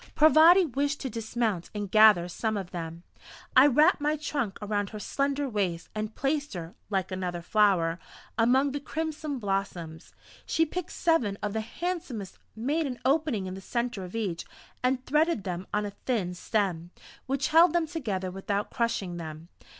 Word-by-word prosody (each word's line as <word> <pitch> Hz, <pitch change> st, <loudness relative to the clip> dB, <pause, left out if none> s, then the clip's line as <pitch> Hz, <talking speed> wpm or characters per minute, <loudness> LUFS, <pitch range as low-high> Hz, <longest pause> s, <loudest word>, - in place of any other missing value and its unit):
Parvati 320 Hz, +4 st, +7 dB
wished 285 Hz, +1 st, -1 dB
to 265 Hz, -, -4 dB
dismount 220 Hz, -4 st, -2 dB
and 205 Hz, -2 st, -4 dB
gather 215 Hz, -5 st, +7 dB
some 215 Hz, +4 st, -2 dB
of 190 Hz, -3 st, -5 dB
them. 165 Hz, -1 st, -6 dB, 0.5 s
I 260 Hz, +3 st, +9 dB
wrapped 295 Hz, +2 st, +4 dB
my 300 Hz, +1 st, +1 dB
trunk 280 Hz, -8 st, -2 dB
around 205 Hz, -1 st, -2 dB
her 215 Hz, -, -7 dB
slender 280 Hz, +5 st, -1 dB
waist, 190 Hz, -8 st, -2 dB
and 215 Hz, 0 st, -4 dB
placed 285 Hz, -3 st, -1 dB
her 170 Hz, -1 st, -6 dB, 0.2 s
like 190 Hz, -3 st, -1 dB
another 180 Hz, -2 st, -3 dB
flower 180 Hz, -4 st, +2 dB, 0.4 s
among 260 Hz, +5 st, +3 dB
the 285 Hz, -, -3 dB
crimson 310 Hz, -1 st, -4 dB
blossoms. 195 Hz, -6 st, -3 dB, 0.3 s
She 325 Hz, -, +1 dB
picked 360 Hz, +2 st, -5 dB
seven 245 Hz, -13 st, +1 dB
of 205 Hz, -1 st, -1 dB
the 220 Hz, -, -1 dB
handsomest, 260 Hz, -, -5 dB, 0.2 s
made 290 Hz, +8 st, 0 dB
an 250 Hz, -2 st, -5 dB
opening 275 Hz, -7 st, +1 dB
in 185 Hz, -, -5 dB
the 190 Hz, -, -8 dB
centre 235 Hz, -1 st, -2 dB
of 180 Hz, +3 st, -8 dB
each, 195 Hz, -7 st, -2 dB, 0.4 s
and 255 Hz, 0 st, 0 dB
threaded 305 Hz, -, +2 dB
them 180 Hz, -1 st, -4 dB
on 210 Hz, 0 st, 0 dB
a 205 Hz, -, -4 dB
thin 200 Hz, -4 st, -2 dB
stem, 180 Hz, -3 st, -1 dB, 0.4 s
which 270 Hz, +1 st, 0 dB
held 330 Hz, +2 st, +6 dB
them 345 Hz, -2 st, +2 dB
together 210 Hz, -, -3 dB
without 200 Hz, +2 st, -3 dB
crushing 200 Hz, -7 st, -1 dB
them. 160 Hz, 0 st, -8 dB
220 Hz, 165 wpm, -28 LUFS, 190-285 Hz, 0.5 s, I